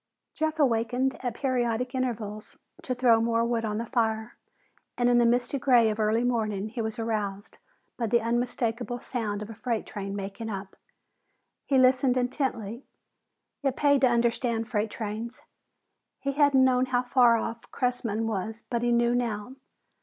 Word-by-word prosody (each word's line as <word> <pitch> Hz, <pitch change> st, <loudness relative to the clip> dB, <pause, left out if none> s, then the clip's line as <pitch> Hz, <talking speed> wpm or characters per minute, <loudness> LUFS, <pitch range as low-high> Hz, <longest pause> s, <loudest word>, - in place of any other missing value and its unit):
Jeff 315 Hz, 0 st, -1 dB
awakened 250 Hz, -1 st, +1 dB
at 245 Hz, -3 st, -2 dB
periodic 250 Hz, -2 st, -1 dB
intervals 225 Hz, -5 st, -4 dB, 0.2 s
to 255 Hz, -, -3 dB
throw 240 Hz, -2 st, +4 dB
more 230 Hz, 0 st, +1 dB
wood 235 Hz, -1 st, 0 dB
on 210 Hz, -1 st, -2 dB
the 230 Hz, -, -2 dB
fire, 225 Hz, -2 st, -1 dB, 0.6 s
and 245 Hz, 0 st, +3 dB
in 240 Hz, 0 st, +5 dB
the 240 Hz, -, +4 dB
misty 245 Hz, +3 st, +1 dB
gray 245 Hz, -5 st, +4 dB
of 215 Hz, -, -5 dB
early 220 Hz, +2 st, +2 dB
morning 215 Hz, -4 st, -1 dB
he 235 Hz, +1 st, -4 dB
was 220 Hz, -1 st, -3 dB
aroused 210 Hz, -2 st, -3 dB, 0.4 s
by 235 Hz, -, -1 dB
the 235 Hz, +2 st, +3 dB
unmistakable 240 Hz, +1 st, -1 dB
sound 210 Hz, -5 st, -3 dB
of 210 Hz, -, -10 dB
a -, -, -7 dB
freight 230 Hz, 0 st, -2 dB
train 200 Hz, -1 st, -5 dB
making 200 Hz, +3 st, -5 dB
up. 195 Hz, -2 st, -6 dB, 0.9 s
He 275 Hz, -, +3 dB
listened 255 Hz, 0 st, +4 dB
intently; 245 Hz, -2 st, -2 dB, 0.8 s
it 270 Hz, -3 st, 0 dB
paid 285 Hz, -2 st, +3 dB
to 265 Hz, -, +6 dB
understand 235 Hz, -1 st, +1 dB
freight 215 Hz, -2 st, -1 dB
trains. 220 Hz, +3 st, -5 dB, 0.8 s
He 275 Hz, -, -1 dB
hadn't 280 Hz, -2 st, +4 dB
known 255 Hz, 0 st, +3 dB
how 250 Hz, -1 st, +1 dB
far 245 Hz, -2 st, +5 dB
off 230 Hz, +1 st, -5 dB
Cressman 235 Hz, -3 st, -1 dB
was, 220 Hz, +1 st, -3 dB
but 235 Hz, -1 st, 0 dB
he 240 Hz, 0 st, +1 dB
knew 235 Hz, 0 st, +3 dB
now. 235 Hz, -1 st, -2 dB
235 Hz, 160 wpm, -27 LUFS, 220-250 Hz, 0.9 s, to